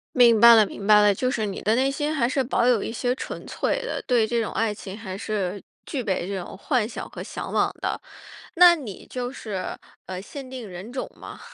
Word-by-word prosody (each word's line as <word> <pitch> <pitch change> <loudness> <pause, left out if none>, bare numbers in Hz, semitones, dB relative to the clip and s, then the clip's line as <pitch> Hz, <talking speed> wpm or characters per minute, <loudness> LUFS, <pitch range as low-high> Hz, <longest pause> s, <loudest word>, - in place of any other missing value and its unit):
明 235 -3 +6
白 235 +1 +10
了 220 -2 +6
明 200 - -8
白 210 0 +7
了。 205 -1 +5
就 255 +6 0
是 220 -4 -1
你 195 - -5
的 215 - +2
内 265 +3 +2
心 295 +2 -2
还 240 -6 +2
是 265 +1 +1
保 240 -1 +1
有 240 -5 +3
一 - - -4
些 245 +2 0
纯 - - -7
粹 - - -1
的， - - -4
对 240 -4 +3
这 235 +1 0
种 215 - -4
爱 220 -2 0
情 195 -1 -8
还 190 -4 -6
是 200 -2 -3 0.2
具 275 -5 -3
备 190 -5 -1
这 195 -1 -3
种 175 - -9
幻 225 +1 0
想 - - -7
和 - - -7
向 - - -6
往 - - +2
的。 - - -2 0.5
那 350 0 +8
你 235 - -9
就 250 0 -4
是， 205 -8 -5 0.3
呃， 185 -1 -5
限 270 +6 -9
定 255 -4 -7
人 185 +6 -9
种 260 - -4
吗？ - - -10
230 Hz, 250 characters per minute, -24 LUFS, 200-255 Hz, 0.5 s, 白